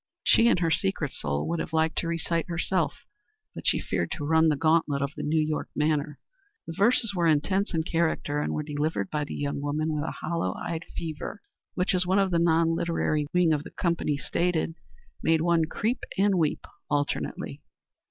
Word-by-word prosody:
She, 230 - +5
in 235 - +4
her 165 -2 +1
secret 170 -6 0
soul, 70 0 -2
would 170 0 -1
have - - -4
liked 160 0 +2
to 170 - -2
recite 170 0 -1
herself, 175 +2 -1 0.5
but - - -7
she - - +3
feared - - -2
to 145 - -4
run 160 +1 +4
the 150 - +2
gauntlet 155 -1 +2
of 140 +1 -3
the - - -5
New 155 +2 +1
York 155 0 -1
manner. 150 -1 0 0.5
The 165 - -6
verses 225 +1 +3
were 175 -3 +2
intense 175 +6 +2
in 160 - +1
character 160 -3 0
and - - -1
were 150 - -2
delivered 150 -8 -2
by 150 -1 -1
the - - -6
young 140 0 -2
woman 155 +2 -1
with 150 -1 -1
a - - -4
hollow 155 - -1
eyed 165 0 -4
fervor 165 +6 -5 0.3
which, 180 +2 +1
as 180 -1 +1
one 190 +2 +3
of 195 -1 +2
the 170 - +3
non 165 -1 +3
literary 160 -3 0
wing 175 -3 +3
of 150 - 0
the - - -10
company 170 -4 -1
stated, 165 +4 0 0.5
made 160 -1 +3
one 170 -1 +3
creep 225 +9 -1 0.2
and 200 +1 +4
weep 155 -3 0 0.2
alternately. 145 -1 -2
160 Hz, 195 wpm, -27 LUFS, 150-170 Hz, 0.5 s, She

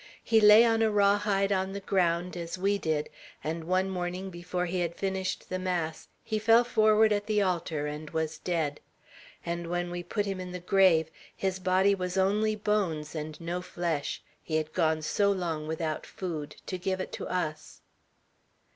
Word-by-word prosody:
"He 225 -1 +4
lay 210 +2 +9
on 225 -1 +2
a 220 - +4
raw 205 -1 +4
hide 200 -1 +1
on 190 0 0
the 200 - -4
ground, 180 -2 0
as 170 +1 -5
we 200 +2 +1
did; 155 -3 -1 0.4
and 160 +1 -3
one 185 +2 +1
morning, 185 0 -4
before 175 +1 -3
he 180 +1 -2
had 170 -1 -1
finished 190 -1 -2
the 185 - -3
mass, 175 -4 -2 0.2
he 215 - -2
fell 225 +2 +5
forward 220 -2 +4
at 205 0 -2
the 210 -2 +2
altar 170 -5 -1
and 150 +1 -5
was 160 0 -2
dead. 160 -5 -1 0.7
And 170 0 -3
when 175 0 -2
we 175 0 -3
put 205 +4 -2
him 195 -2 -3
in 180 -1 -6
the 180 - -4
grave, 175 -3 +4 0.2
his 190 -1 -2
body 185 +2 +3
was 180 -1 -3
only 210 +3 +2
bones, 195 -8 -1
and 155 -1 -5
no 175 +1 -3
flesh; 170 -5 -3 0.2
he 155 - -4
had 155 0 -1
gone 160 -3 +1
so 200 +5 +2
long 165 -5 -2
without 160 -1 -3
food, 160 -6 -5
to 185 - -4
give 190 +1 -1
it 185 - -4
to - - -5
us." 155 -4 -4
180 Hz, 185 wpm, -29 LUFS, 165-200 Hz, 0.7 s, lay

